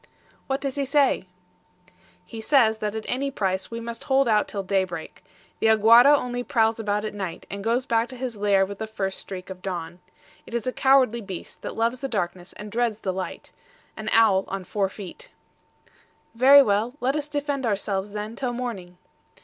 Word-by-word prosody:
"What 270 +1 -1
does 275 -1 -3
he 280 - +1
say?" 275 -7 +2 1.0
"He 225 -1 -8
says 220 -3 +3
that 210 0 -3
at 220 - -5
any 275 +2 -1
price 190 -7 -2
we 230 - -5
must 230 0 -7
hold 270 -1 +3
out 215 -2 +3
till 200 -2 -4
daybreak. 185 -4 -2 0.4
The - - +2
AGUARA 230 +6 +7
only 245 -2 -3
prowls 225 -3 +1
about 210 -1 -1
at 215 - -4
night, 190 -5 -5
and 200 0 -5
goes 235 +3 +1
back 230 0 +1
to 260 - -9
his 250 -2 -4
lair 200 -2 +3
with 200 +1 -8
the 220 - -4
first 195 -3 -3
streak 185 0 -8
of 185 -1 -9
dawn. 175 -2 -5 0.5
It 235 - -6
is 235 - -2
a 255 - -1
cowardly 260 -4 +3
beast, 190 -4 -8
that - - -6
loves 230 +2 0
the 270 - -3
darkness 180 -5 -3
and 210 0 -9
dreads 230 -2 -1
the 190 - -2
light 185 0 -6 0.4
an 215 0 -4
owl 205 -4 +4
on 195 -1 -4
four 195 +1 -1
feet." 210 - -10 1.0
"Very 270 +4 +8
well, 220 +3 0
let 265 +2 0
us 295 -1 -2
defend 285 -3 -2
ourselves, 200 -1 -2
then, 210 +2 -5
till 250 -1 -2
morning." 205 -8 -5
220 Hz, 190 wpm, -25 LUFS, 195-250 Hz, 1.0 s, Very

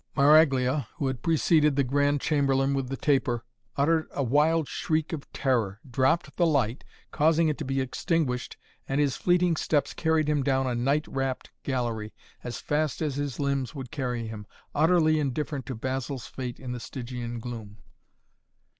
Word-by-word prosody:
Maraglia, 140 -3 +4
who 140 - -3
had 130 -2 -2
preceded 155 -2 +3
the 140 - +3
Grand 145 +2 +2
Chamberlain 135 -2 +2
with 135 -2 -2
the 135 - -3
taper, 125 -5 +1 0.3
uttered 160 +3 +2
a 140 - -2
wild 150 +4 +3
shriek 155 +1 -1
of 150 -3 -6
terror, 115 -8 0
dropped 130 +7 +1
the 175 - +4
light, 130 -5 +1 0.3
causing 160 +1 +3
it 150 - -1
to - - -3
be 135 +1 -1
extinguished 130 -1 -1 0.3
and 135 +1 +1
his 145 -3 +2
fleeting 175 -1 +2
steps 150 -2 0
carried 160 -2 +1
him 150 -1 +2
down 135 0 +1
a 125 - 0
night 140 +6 +1
wrapped 135 -1 -3
gallery 120 -5 -3 0.3
as 120 -1 -5
fast 150 -2 -1
as 150 -3 -1
his 145 -4 -3
limbs 140 0 -1
would 130 -3 -7
carry 125 -4 -2
him, 110 -2 -7 0.3
utterly 155 0 +4
indifferent 140 -1 -2
to 130 - -4
Basil's 130 +1 -3
fate 125 -2 -6
in 130 -2 -6
the 125 - -4
Stygian 120 -1 -6
gloom. 110 -3 -7
135 Hz, 165 wpm, -27 LUFS, 125-150 Hz, 0.3 s, Maraglia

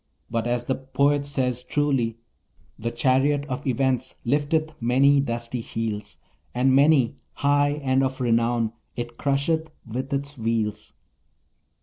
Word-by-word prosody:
But 115 0 -1
as 120 0 -1
the 130 - +1
poet 140 +2 +1
says 125 -3 -1
truly: 125 -4 0 0.6
"The 115 +2 -2
chariot 135 +4 +2
of 130 -1 -5
Events 130 -1 0
lifteth 150 +4 +1
many 135 +4 +4
dusty 120 -1 -3
heels, 110 -2 -4 0.4
And 130 +2 +3
many, 140 -3 +4 0.2
high 145 +1 +2
and 130 0 +2
of 130 0 -2
renown, 115 -2 +1 0.2
it 120 0 -6
crusheth 150 +3 0 0.2
with 130 +4 -4
its 140 0 -3
wheels." 110 -2 -2
130 Hz, 125 wpm, -24 LUFS, 115-140 Hz, 0.6 s, many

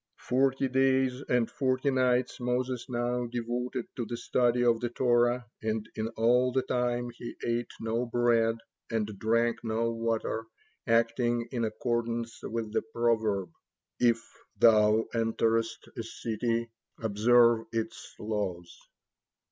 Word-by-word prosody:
Forty 135 +1 +1
days 130 0 +2
and 125 -2 +3
forty 130 -1 0
nights 125 -1 +1
Moses 125 0 -1
now 120 0 -1
devoted 120 +1 -3
to 120 - -1
the 120 - -4
study 120 0 +1
of 115 -1 +4
the 120 - -2
Torah, 120 0 +2 0.2
and 110 0 -2
in 110 0 -2
all 125 +3 +3
the 130 +1 +1
time 120 -1 -1
he 120 - -8
ate 120 0 -1
no 115 +2 -1
bread 115 -1 +2 0.3
and 115 -2 0
drank 115 +1 +1
no 115 +1 0
water, 115 -1 -2 0.4
acting 115 +1 +2
in 120 -2 -1
accordance 115 +1 -2
with 115 -2 -4
the - - +2
proverb, 110 -5 0 0.5
"If 115 -1 +3 0.3
thou 110 -1 +5
enterest 115 0 0
a - - -3
city, 115 +1 -2 0.3
observe 115 +2 +4
its 115 -1 -4
laws." 100 -5 -3
120 Hz, 125 wpm, -29 LUFS, 115-125 Hz, 0.5 s, thou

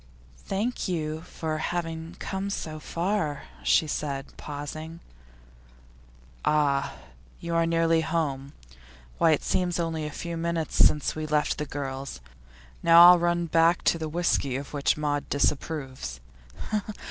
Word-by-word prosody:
'Thank 215 +6 -2
you 160 -3 -2
for 160 -2 -4
having 165 -1 -3
come 195 +1 -3
so 155 -5 -4
far,' 165 -2 -2 0.2
she 60 - +3
said, 140 -2 -4
pausing. 155 +3 -7 1.4
'Ah, 140 -2 +2 0.4
you 170 0 -4
are 165 0 +3
nearly 165 0 +3
home. 145 -4 -2 0.7
Why, 165 - +5
it 155 - +2
seems 180 -2 0
only 160 -2 -2
a - - -6
few 170 +3 -5
minutes 165 -1 -2
since 150 -2 +4
we 155 0 -4
left 150 -1 +1
the 150 - -3
girls. 135 - -5 0.6
Now 170 +1 +9
I'll 180 - +5
run 175 0 +1
back 165 +1 +3
to 165 - +2
the 160 -1 -3
whisky 150 -5 0
of 140 +2 -6
which 145 0 +1
Maud 145 -1 -1
disapproves. 135 - -1
160 Hz, 135 wpm, -27 LUFS, 145-170 Hz, 1.4 s, Now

